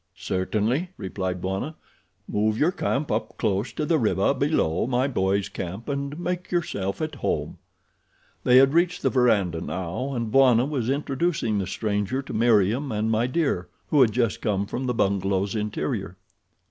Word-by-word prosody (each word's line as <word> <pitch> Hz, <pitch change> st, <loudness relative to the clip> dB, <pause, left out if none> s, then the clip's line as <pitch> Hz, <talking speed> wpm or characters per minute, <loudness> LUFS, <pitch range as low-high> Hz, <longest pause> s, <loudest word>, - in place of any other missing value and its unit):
"Certainly," 105 Hz, -, -1 dB
replied 95 Hz, -1 st, -4 dB
Bwana. 95 Hz, +12 st, -3 dB, 0.5 s
"Move 110 Hz, +1 st, 0 dB
your 160 Hz, +8 st, +3 dB
camp 145 Hz, -4 st, -1 dB
up 110 Hz, +1 st, -2 dB
close 100 Hz, +5 st, 0 dB
to 150 Hz, -, -2 dB
the 160 Hz, 0 st, +2 dB
river 100 Hz, 0 st, +2 dB
below 140 Hz, -, +1 dB
my 130 Hz, +1 st, +1 dB
boys' 100 Hz, -6 st, 0 dB
camp 95 Hz, +6 st, -6 dB
and 140 Hz, +2 st, -3 dB
make 180 Hz, +1 st, -3 dB
yourself 130 Hz, -, -2 dB
at 155 Hz, -, -3 dB
home." -, -, -2 dB, 0.8 s
They 125 Hz, -, +6 dB
had 135 Hz, +2 st, +6 dB
reached 175 Hz, +1 st, +2 dB
the 135 Hz, -, +2 dB
verandah 100 Hz, -10 st, +2 dB
now 95 Hz, +10 st, -3 dB
and 115 Hz, -2 st, -2 dB
Bwana 130 Hz, -2 st, +5 dB
was 135 Hz, -5 st, -2 dB
introducing 140 Hz, -5 st, 0 dB
the 95 Hz, -, -2 dB
stranger 105 Hz, +6 st, -1 dB
to -, -, -8 dB
Meriem 115 Hz, +4 st, +2 dB
and 110 Hz, +1 st, 0 dB
My 115 Hz, +2 st, +2 dB
Dear, 130 Hz, -, 0 dB, 0.2 s
who 145 Hz, -, +5 dB
had 120 Hz, -4 st, +5 dB
just 115 Hz, -2 st, 0 dB
come 100 Hz, -3 st, 0 dB
from 125 Hz, +5 st, -4 dB
the 125 Hz, -, 0 dB
bungalow's 95 Hz, -1 st, 0 dB
interior. 105 Hz, -2 st, -3 dB
115 Hz, 160 wpm, -25 LUFS, 100-140 Hz, 0.8 s, They